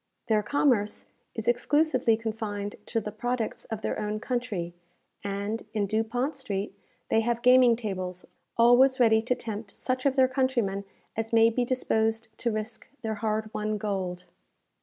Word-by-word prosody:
Their 215 -1 +4
commerce 230 -3 +1 0.3
is 225 - -5
exclusively 255 -1 +3
confined 215 -2 -4
to 230 - 0
the 210 -1 -5
products 235 +1 -3
of 220 -1 -5
their - - -1
own 210 0 -2
country; 220 -8 -3 0.5
and, 200 +2 -2
in 205 -2 +2
Dupont 225 +7 -1
Street, 205 -7 -3 0.4
they 225 - +4
have 235 +1 -1
gaming 250 -1 +7
tables 185 -5 -4 0.3
always 245 +3 +6
ready 220 -2 +5
to 250 +2 0
tempt 220 -3 -6
such 255 +5 -1
of 270 - +1
their 260 -2 +5
countrymen 250 -7 0 0.3
as 225 0 -3
may 230 0 +6
be 245 +2 0
disposed 225 -3 0
to 240 - 0
risk 215 +1 -4 0.2
their 220 -1 -1
hard 215 0 -1
won 215 0 -1
gold. 190 -4 -3
225 Hz, 155 wpm, -28 LUFS, 210-245 Hz, 0.5 s, gaming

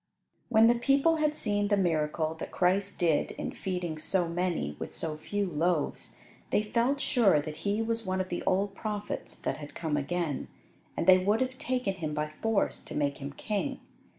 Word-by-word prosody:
When 225 -1 +6
the 235 - +7
people 275 +7 +3
had 305 -1 +1
seen 205 -4 +1
the 205 0 +3
miracle 160 -3 +1
that - - -5
Christ 195 +2 +1
did 165 -5 +2
in - - -4
feeding 180 -4 -3
so 175 +2 +1
many 170 - -1
with - - -5
so 160 -2 -3
few 205 +6 -2
loaves, 170 -2 -1 0.3
they 210 - +2
felt 235 +6 +1
sure 215 - +4
that 150 +1 -5
He 205 +2 0
was 230 0 -1
one 185 -2 -1
of 185 0 -2
the 175 - -2
old 195 +2 +2
prophets 210 0 -4
that - - -2
had 150 -1 -9
come 155 -3 -1
again, 155 0 -2 0.5
and - - 0
they 185 +1 +8
would 205 +4 +2
have 260 0 -2
taken 250 -6 0
Him 155 -5 -4
by 150 0 -2
force 225 -3 +1
to - - -7
make 145 -1 0
Him 140 0 -6
king. 215 - -2
190 Hz, 190 wpm, -29 LUFS, 160-220 Hz, 0.5 s, they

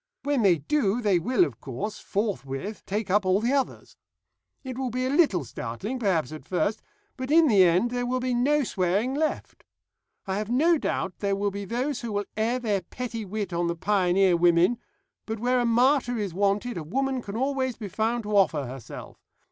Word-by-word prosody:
When 285 -3 +1
they 190 -5 +4
do 210 - 0
they 205 -6 +2
will, 190 +1 +3
of 125 -6 -9
course, 195 - -5
forthwith 195 - -3
take 205 -1 -2
up 205 +1 +3
all 185 +1 +2
the 235 +5 0
others. 275 -2 -2 0.7
It 260 -2 -6
will 260 0 -2
be 255 +2 -2
a 260 - 0
little 280 - +3
startling 195 - -5
perhaps 175 - 0
at 155 - -8
first, 195 +3 -1 0.4
but 260 0 -5
in 320 +1 +6
the 205 -7 +6
end 180 +7 +3
there 245 0 -2
will 255 +1 0
be 255 0 -1
no 285 +5 +2
swearing 200 +4 0
left. 310 +2 -3 0.6
I 195 0 -2
have 210 0 -4
no 310 +7 +3
doubt 190 -8 -2
there 200 -1 0
will 200 +1 -1
be 200 +1 -5
those 250 +6 -2
who 235 -2 -4
will 205 0 -1
air 225 +3 0
their 210 -6 -1
petty 230 +3 -6
wit 200 -2 -4
on 170 0 0
the 170 - -1
pioneer 190 0 +2
women, 175 +6 +3 0.5
but 220 0 -3
where 250 +2 +2
a 240 - +1
martyr 245 +1 +3
is 200 -5 -3
wanted 200 +5 0
a 165 - -4
woman 265 - -1
can 205 -1 -6
always 260 -1 -1
be 215 - -6
found 225 +4 -1
to 210 0 -2
offer 165 -8 +3
herself. 125 -1 -9
215 Hz, 200 wpm, -26 LUFS, 185-250 Hz, 0.7 s, in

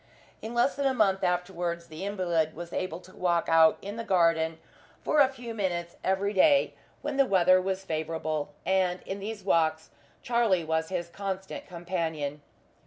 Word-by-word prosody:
In 225 +2 -6
less 240 +4 +3
than 280 -1 +1
a 265 - +1
month 195 -4 +2
afterwards 175 -1 -1
the 160 +3 -8
invalid 175 -6 0
was 170 +1 -8
able 175 -2 -3
to 185 +1 -16
walk 175 -2 +1
out 160 -1 +5
in 205 +3 -6
the 230 - -3
garden 165 -4 +2 0.5
for 305 - +2
a 275 - +7
few 245 -3 -8
minutes 175 -5 -2
every 190 +2 0
day 280 +8 +4 0.3
when 275 - -3
the 275 - +5
weather 185 -2 +5
was 190 0 -3
favourable, 155 -2 -2 0.2
and 185 -1 +1
in 195 +1 -5
these 210 +2 -6
walks 160 -1 +1 0.3
Charlie 230 -7 +2
was 160 0 -1
his 175 -2 -3
constant 190 0 -5
companion. 165 -5 -3
180 Hz, 170 wpm, -28 LUFS, 165-200 Hz, 0.5 s, a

